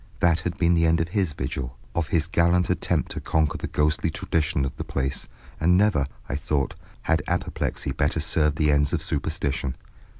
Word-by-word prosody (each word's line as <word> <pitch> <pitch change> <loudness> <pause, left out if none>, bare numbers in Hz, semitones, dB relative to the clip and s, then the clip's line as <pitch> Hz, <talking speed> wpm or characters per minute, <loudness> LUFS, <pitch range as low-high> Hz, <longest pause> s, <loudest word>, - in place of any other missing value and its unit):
That 85 0 +4
had 85 +2 -3
been 85 0 +3
the 85 -1 +3
end 80 +1 +3
of 80 0 -1
his 95 -4 0
vigil, 65 -1 -4 0.2
of 80 +1 0
his 80 -1 +1
gallant 85 +1 +2
attempt - - 0
to - - -4
conquer 80 -2 +1
the - - -3
ghostly 75 +2 +1
tradition 75 -2 0
of 65 - -4
the - - -3
place, 65 0 -2 0.3
and 90 +3 +4
never, 95 -9 +3 0.2
I - - -2
thought, 70 -1 -1 0.3
had - - +2
apoplexy - - -2
better 75 +2 0
served 75 -1 +2
the 75 -1 +2
ends 70 -1 +2
of - - 0
superstition. 70 -2 -2
80 Hz, 190 wpm, -25 LUFS, 70-85 Hz, 0.3 s, That